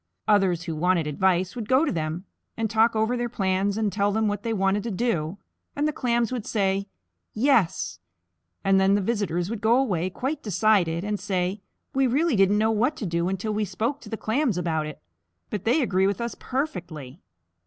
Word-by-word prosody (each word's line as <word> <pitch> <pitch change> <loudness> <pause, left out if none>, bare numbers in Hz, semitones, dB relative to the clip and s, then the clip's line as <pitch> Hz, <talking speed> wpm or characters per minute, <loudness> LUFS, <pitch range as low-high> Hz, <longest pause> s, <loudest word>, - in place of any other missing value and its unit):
Others 190 -5 +3
who 165 -2 -4
wanted 175 0 +2
advice 180 - +1
would 230 -4 -5
go 260 +5 +4
to - - 0
them, 160 +2 -3 0.3
and 225 0 0
talk 225 +1 +3
over 220 +3 +1
their 240 -1 -2
plans 195 -2 0
and 215 -3 0
tell 205 0 +1
them 220 +1 +1
what 205 -1 -2
they 230 - -3
wanted 195 -1 +1
to 235 - -4
do, 195 -6 -1 0.4
and 290 +1 +1
the 305 - -1
Clams 240 -2 0
would 245 -4 -4
say, 195 -2 0 0.5
"Yes," 215 - +2 0.6
and 195 0 +4
then 190 +1 +4
the - - +2
visitors 190 -4 -1
would 230 -2 -4
go 230 +2 +4
away 185 -10 0
quite 270 +9 -3
decided, 190 -4 +2
and 205 0 -2
say, 190 0 -2 0.3
"We 270 0 +3
really 290 +3 +2
didn't 195 +1 +4
know 220 +1 +2
what 245 +7 +1
to 220 - -4
do 170 0 0
until 195 +3 -2
we 215 +1 0
spoke 225 +9 -2
to 215 - -11
the 220 - -4
Clams 230 - 0
about 160 -3 -1
it, 155 - -8 0.5
but 205 -3 -4
they 260 +6 +3
agree 190 -4 +2
with 200 - -1
us 235 0 -3
perfectly." 175 - -4
205 Hz, 200 wpm, -25 LUFS, 185-230 Hz, 0.6 s, go